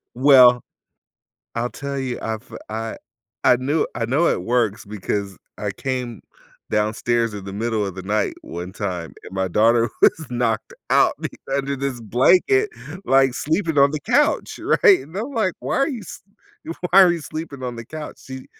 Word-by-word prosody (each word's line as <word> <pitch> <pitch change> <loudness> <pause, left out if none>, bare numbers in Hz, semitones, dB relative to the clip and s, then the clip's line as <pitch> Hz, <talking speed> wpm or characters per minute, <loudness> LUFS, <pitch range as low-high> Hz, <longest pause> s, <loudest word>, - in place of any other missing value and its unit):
Well 125 -2 +7 1.0
I'll 120 +1 -1
tell 140 -1 -5
you, 130 -2 -3
I've 110 +2 -5 0.2
I 110 +1 -4 0.5
I - - +6
knew 140 +5 0
I 115 - -2
know 145 +8 +2
it - - +1
works 115 0 0
because 100 -1 -4 0.2
I 105 -1 -2
came 125 +2 -4 0.5
downstairs 115 +2 0
in 100 - -7
the 95 - -7
middle 110 0 -1
of 95 - -6
the 95 - -7
night 105 +3 -1
one 90 +2 -7
time, 90 -5 -4
and - - -11
my 95 0 -1
daughter 115 +5 +3
was 160 - +4
knocked 120 -3 -1 0.2
out - - +5
be - - -3 0.3
under 140 0 -2
this 135 -2 -3
blanket, 185 - +3 0.3
like, 135 -1 +3
sleeping 160 0 -1
on 140 +1 +5
the 155 - -3
couch, 295 - +1 0.3
right? 395 -5 +8
And 165 - -12
I'm 230 +7 -3
like, 210 -5 +1
"Why - - -2
are 275 - +2
you 255 -7 -5
s - - -10 0.7
why 195 +2 +8
are 180 -2 +5
you 170 - -3
sleeping 150 -2 -7
on 125 -1 -4
the 115 0 -8
couch?" 155 -1 -8
She 130 -1 -9
125 Hz, 175 wpm, -21 LUFS, 110-145 Hz, 1.0 s, right